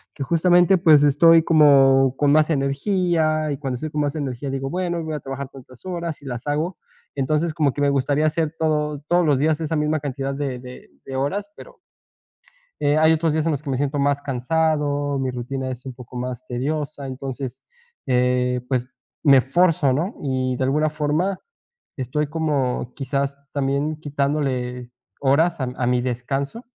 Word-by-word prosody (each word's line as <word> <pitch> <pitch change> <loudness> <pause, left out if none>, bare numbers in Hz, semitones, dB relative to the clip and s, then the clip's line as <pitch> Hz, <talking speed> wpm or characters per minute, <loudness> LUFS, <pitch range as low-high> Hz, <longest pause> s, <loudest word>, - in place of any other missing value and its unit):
que 140 - -4
justamente, 175 +3 +4
pues, 155 -5 +6
estoy 165 +3 +6
como 135 -4 +5
con 145 -1 +3
más 155 +1 +4
energía 155 +1 +1
y 140 - -3
cuando 135 -3 -3
estoy 155 +5 -5
con 150 - -1
más 145 +1 -1
energía 135 -2 -4
digo, 135 0 -3
bueno, 175 -2 -2
voy 160 -1 -4
a 150 - -3
trabajar 135 0 -6
tantas 130 +2 -15
horas 170 -3 -4
y - - -13
las 125 +1 -6
hago, 155 +5 -1 0.4
entonces, 155 +4 0
como 150 -5 +1
que 145 - -4
me 140 - +3
gustaría 140 +2 +1
hacer 155 0 0
todo 150 -2 0
todos 175 -1 +3
los 145 -3 +3
días 155 +1 +1
esa 160 0 -2
misma 150 +1 0
cantidad 135 -1 -3
de 135 -3 -3
de 125 0 -12 0.2
de 135 - -6
horas 200 +10 -2
pero - - -14 1.0
eh, 145 +1 +2
hay 160 +1 +5
otros 160 -1 +1
días 160 0 0
en 165 - +2
los 145 -1 -2
que 140 - -6
me 130 - 0
siento 145 +1 -1
más 140 0 +1
cansado, 145 +1 0
mi 130 -1 -1
rutina 130 +2 -4
es 125 +1 -8
un 130 - -6
poco 125 0 -10
más 125 0 -4
tediosa, 140 +3 -3
entonces, 130 -1 -6 0.4
eh, 125 -1 +1
pues, 125 -1 -1 0.3
me 135 -4 +7
fuerzo, 150 -1 +2
¿no?, 170 - -2
y 130 -2 -1
de 130 - -1
alguna 150 +3 +1
forma 155 +6 -1 0.6
estoy 135 +4 -2
como, 145 -6 -1
quizás, 140 0 -2 0.2
también 140 +2 -1
quitándole 135 -4 -2 0.3
horas 145 +3 +2
a 130 - -1
mi 125 - -5
a 120 - 0
mi 125 0 +2
descanso. 135 - -3
145 Hz, 180 wpm, -22 LUFS, 130-155 Hz, 1.0 s, me